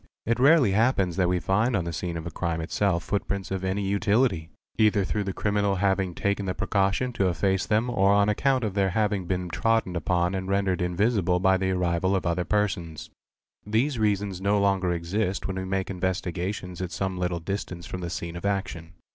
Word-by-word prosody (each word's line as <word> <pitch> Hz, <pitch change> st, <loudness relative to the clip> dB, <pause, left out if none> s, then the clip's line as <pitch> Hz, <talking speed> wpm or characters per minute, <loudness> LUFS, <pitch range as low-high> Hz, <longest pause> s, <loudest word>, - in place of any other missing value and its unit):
It 115 Hz, +2 st, 0 dB
rarely 140 Hz, -4 st, +5 dB
happens 100 Hz, -5 st, +2 dB
that 90 Hz, -2 st, +2 dB
we 90 Hz, 0 st, +1 dB
find 105 Hz, +7 st, +1 dB
on 90 Hz, -4 st, 0 dB
the 85 Hz, -, -4 dB
scene 85 Hz, 0 st, -3 dB
of 80 Hz, -, -5 dB
the 85 Hz, -, -6 dB
crime 85 Hz, -2 st, -2 dB
itsell 85 Hz, +2 st, 0 dB
footprints 100 Hz, 0 st, -3 dB
of 95 Hz, -1 st, -2 dB
any 95 Hz, +2 st, -1 dB
utility, 100 Hz, -3 st, +1 dB, 0.3 s
either 105 Hz, -2 st, +4 dB
through 105 Hz, +2 st, -2 dB
the 95 Hz, -, -2 dB
criminal 100 Hz, 0 st, 0 dB
having 95 Hz, -2 st, 0 dB
taken 100 Hz, 0 st, -1 dB
the 90 Hz, -, -2 dB
precaution 100 Hz, +5 st, 0 dB
to 100 Hz, -5 st, +1 dB
efface 95 Hz, +2 st, 0 dB
them 110 Hz, +3 st, +2 dB
or 100 Hz, -5 st, +3 dB
an 100 Hz, 0 st, +4 dB
account 130 Hz, +4 st, +1 dB
of 105 Hz, -3 st, -1 dB
their 100 Hz, -1 st, +2 dB
having 100 Hz, -2 st, 0 dB
been 90 Hz, -1 st, -2 dB
trodden 115 Hz, -1 st, 0 dB
upot 85 Hz, +2 st, 0 dB
and 95 Hz, 0 st, -3 dB
rendered 100 Hz, -2 st, +1 dB
invisible 90 Hz, 0 st, +1 dB
by 95 Hz, +1 st, +4 dB
the 95 Hz, 0 st, -1 dB
arrival 90 Hz, +1 st, +1 dB
of 95 Hz, -, -1 dB
other 85 Hz, +1 st, 0 dB
persons.: 90 Hz, -7 st, -2 dB, 0.5 s
These 115 Hz, +5 st, 0 dB
reasons 100 Hz, -3 st, 0 dB
no 100 Hz, +1 st, +2 dB
longer 95 Hz, -2 st, +2 dB
exist 90 Hz, +4 st, -2 dB
when 95 Hz, -1 st, -3 dB
we 95 Hz, -, -3 dB
make 95 Hz, 0 st, -2 dB
investigations 90 Hz, 0 st, -3 dB
at 90 Hz, -2 st, -4 dB
som 95 Hz, 0 st, -3 dB
little 90 Hz, -1 st, -1 dB
distance 90 Hz, 0 st, -5 dB
from 90 Hz, -, -6 dB
the 85 Hz, -, -4 dB
scene 85 Hz, 0 st, -5 dB
of 85 Hz, -, -7 dB
action. 95 Hz, -4 st, -3 dB
95 Hz, 200 wpm, -26 LUFS, 90-100 Hz, 0.5 s, rarely